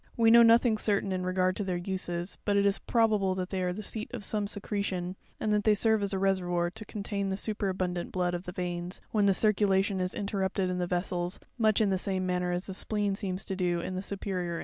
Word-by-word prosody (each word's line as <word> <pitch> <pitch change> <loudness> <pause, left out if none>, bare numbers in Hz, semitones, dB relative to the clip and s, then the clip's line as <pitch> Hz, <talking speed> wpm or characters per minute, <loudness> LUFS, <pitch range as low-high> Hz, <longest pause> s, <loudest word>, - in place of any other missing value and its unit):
We 225 -1 +5
know 235 +1 +9
nothing 230 -1 +5
certain 200 -2 +1
in 185 -1 -2
regard 185 0 +1
to 205 - -1
their 185 -2 -1
uses; 175 -1 -3
but 205 -1 +1
it 200 - +3
is 200 -1 +2
probable 215 -5 +2
they 185 0 -3
are 180 -1 0
the 210 +4 -5
seat 220 +1 -3
of 220 - -6
some 205 0 -1
secretion, 195 -3 -3 0.2
and 215 - 0
that 210 0 +2
they 215 0 +4
serve 220 +1 +2
as 200 -1 -1
a 195 - -1
reservoir 180 -3 +1
to 215 - -8
contain 200 -1 -3
the 190 - -2
superabundant 190 -4 -2
blood 180 -1 0
of 175 +1 -4
the 180 - -5
veins, 175 0 -4
when 205 -2 +3
the 195 - +5
circulation 195 -2 +2
is 185 0 -2
interrupted 195 -2 -1
in 180 - -2
the 175 - -1
vessels, 175 0 -1 0.2
much 220 -1 +3
in 205 -2 +3
the 190 - +1
same 190 -1 -1
manner 180 -1 0
as 175 +1 -2
the 190 - -4
spleen 205 +1 0
seems 195 -2 -3
to 190 - -3
do 175 -2 0
in 180 - -4
the 185 - -3
superior 190 -3 -3
animals. 165 - -3
190 Hz, 240 wpm, -29 LUFS, 180-205 Hz, 0.2 s, know